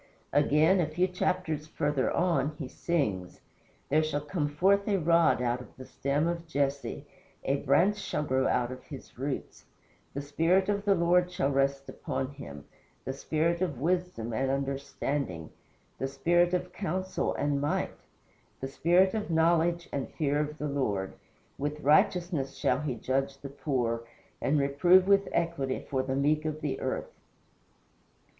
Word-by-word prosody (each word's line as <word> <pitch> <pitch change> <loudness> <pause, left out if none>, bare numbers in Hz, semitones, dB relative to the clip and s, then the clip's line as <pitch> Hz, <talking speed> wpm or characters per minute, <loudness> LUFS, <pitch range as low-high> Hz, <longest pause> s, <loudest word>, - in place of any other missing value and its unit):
Again, 150 +6 +4
a 170 - +2
few 175 +4 +1
chapters 180 -4 -1
further 145 -3 0
on, 155 -5 +1
he 140 - -5
sings: 105 - -2 0.5
"There 155 +3 +4
shall 155 -2 -1
come 150 0 -2
forth 195 +7 +2
a 205 -2 +2
rod 165 -5 +3
out 120 0 0
of - - -15
the 130 - -9
stem 140 +4 -1
of 170 -1 -3
Jesse 140 -1 -2 0.4
A 135 +1 +1
Branch 170 +10 +3
shall 200 -7 -3
grow 130 -2 +1
out 125 0 +1
of 130 - -8
his 135 -4 -11
roots. 135 +1 -4 0.5
The 140 - -2
Spirit 165 +7 +2
of 200 0 0
the 200 -1 +4
Lord 175 +1 +3
shall 140 -5 0
rest 135 0 +1
upon 135 +1 -4
him; 70 - -9 0.4
The 130 - -2
spirit 160 +5 0
of 155 -9 -1
wisdom 175 -8 -1
and 130 +4 0
understanding, 135 - -2 0.5
The 135 - -1
spirit 175 +6 +2
of 180 0 -3
counsel 185 0 -2
and 145 -1 0
might, 145 - -1 0.7
The 135 - -4
spirit 180 +6 +3
of 215 -3 -3
knowledge, 170 +1 +2
and 140 -2 -2
fear 145 -2 0
of 150 0 -2
the 150 - -3
Lord. 105 -9 -1 0.5
With 150 +2 -2
righteousness 155 0 +2
shall 130 +3 +1
he 145 -5 -2
judge 135 +4 -1
the 140 0 -8
poor, 120 -5 -2 0.3
And 150 - +2
reprove 175 +7 +4
with 200 0 +4
equity 165 -6 -1
for 135 -1 0
the 130 0 -2
meek 150 +3 +2
of 155 0 -3
the 135 -3 -2
earth." 130 - -3
145 Hz, 160 wpm, -29 LUFS, 135-170 Hz, 0.7 s, Again